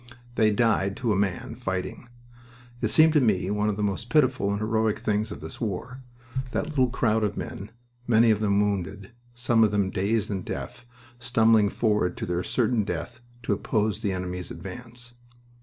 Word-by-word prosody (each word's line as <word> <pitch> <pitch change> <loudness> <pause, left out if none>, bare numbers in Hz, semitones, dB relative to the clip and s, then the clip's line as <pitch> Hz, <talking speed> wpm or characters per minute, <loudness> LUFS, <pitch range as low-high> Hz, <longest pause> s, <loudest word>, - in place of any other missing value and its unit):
They 110 -3 +3
died 105 -2 +1
to 120 -5 0
a - - 0
man, 95 -2 -1
fighting. 100 +1 -4 0.7
It - - +2
seemed 160 0 +5
to 150 - +4
me 100 -5 +1
one 105 +1 +1
of 105 - -2
the 105 - -1
most 105 +3 -2
pitiful 130 -7 +2
and 100 - 0
heroic 110 0 0
things 105 0 -1
of - - -7
this 80 +1 -9
war, 115 +5 -4 0.5
that 150 - -1
little 130 -5 +2
crowd 110 -3 +1
of 105 -1 -1
men, 100 +2 -6 0.4
many 115 -1 +5
of 105 - +1
them 100 -2 +2
wounded, 100 -1 -2 0.2
some 120 -2 +3
of 110 - +4
them 100 -2 0
dazed 105 +3 0
and 95 -2 -3
deaf, 120 - -6 0.3
stumbling 115 -3 +4
forward 105 -5 0
to - - -3
their 90 0 -1
certain 115 +2 +1
death 120 +3 -5 0.2
to 110 - +1
oppose 105 +1 0
the 105 -4 0
enemy's 90 -1 -4
advance. 120 +7 -9
105 Hz, 180 wpm, -26 LUFS, 100-120 Hz, 0.7 s, seemed